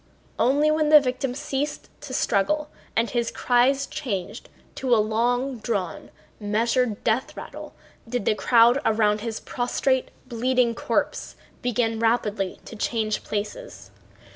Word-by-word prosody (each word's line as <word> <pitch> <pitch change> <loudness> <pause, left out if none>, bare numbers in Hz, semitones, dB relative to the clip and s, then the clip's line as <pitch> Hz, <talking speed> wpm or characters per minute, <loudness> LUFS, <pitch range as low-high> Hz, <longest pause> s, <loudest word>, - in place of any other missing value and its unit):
Only 290 +4 +3
when 310 -1 +2
the 305 0 +9
victim 255 -1 -2
ceased 280 +1 -3
to 290 -2 -9
struggle 295 +7 0 0.2
and 230 +1 +2
his 235 -1 0
cries 260 +3 +2
changed 220 - -5 0.2
to 255 -3 +1
a - - +3
long 240 +4 0
drawn, 200 -6 -3 0.3
measured 225 +2 0
death 235 +3 0
rattle - - -9 0.3
did 245 -4 -2
the - - +3
crowd 235 +4 +4
around 215 -1 +2
his 225 -1 -4
prostrate, 255 +1 -1 0.2
bleeding 245 0 +1
corpse - - -2 0.3
begin 230 -2 0
rapidly 215 -4 0
to - - -9
change 215 -1 -1
places. 355 - -5
240 Hz, 130 wpm, -24 LUFS, 220-260 Hz, 0.3 s, the